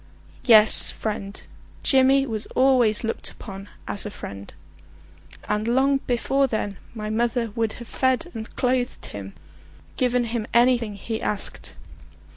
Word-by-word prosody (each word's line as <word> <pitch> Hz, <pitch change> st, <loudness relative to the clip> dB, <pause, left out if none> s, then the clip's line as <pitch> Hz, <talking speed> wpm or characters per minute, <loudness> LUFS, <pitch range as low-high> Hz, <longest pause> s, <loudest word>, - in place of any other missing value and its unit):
Yes, 220 Hz, -3 st, +7 dB
friend; 205 Hz, -2 st, -5 dB, 0.4 s
Jimmy 270 Hz, 0 st, +4 dB
was 220 Hz, -4 st, -4 dB
always 250 Hz, -5 st, +3 dB
looked 225 Hz, -, -3 dB
upon 195 Hz, -1 st, -10 dB, 0.2 s
as 200 Hz, -, -2 dB
a 210 Hz, -, -3 dB
friend; 100 Hz, -, -9 dB, 1.0 s
and 210 Hz, +1 st, -1 dB
long 265 Hz, +3 st, +3 dB
before 270 Hz, +3 st, +1 dB
then 205 Hz, -5 st, -3 dB, 0.2 s
my 215 Hz, -1 st, -4 dB
mother 230 Hz, 0 st, 0 dB
would 225 Hz, 0 st, -1 dB
have 235 Hz, -, -10 dB
fed 260 Hz, +6 st, 0 dB
and 220 Hz, 0 st, -7 dB
clothed 250 Hz, -1 st, -1 dB
him, 100 Hz, -1 st, -8 dB, 0.6 s
given 250 Hz, -1 st, +1 dB
him 230 Hz, -1 st, -3 dB
anything 235 Hz, -3 st, +3 dB
he 220 Hz, +3 st, -5 dB
asked. 205 Hz, -2 st, -3 dB
230 Hz, 130 wpm, -24 LUFS, 210-255 Hz, 1.0 s, Yes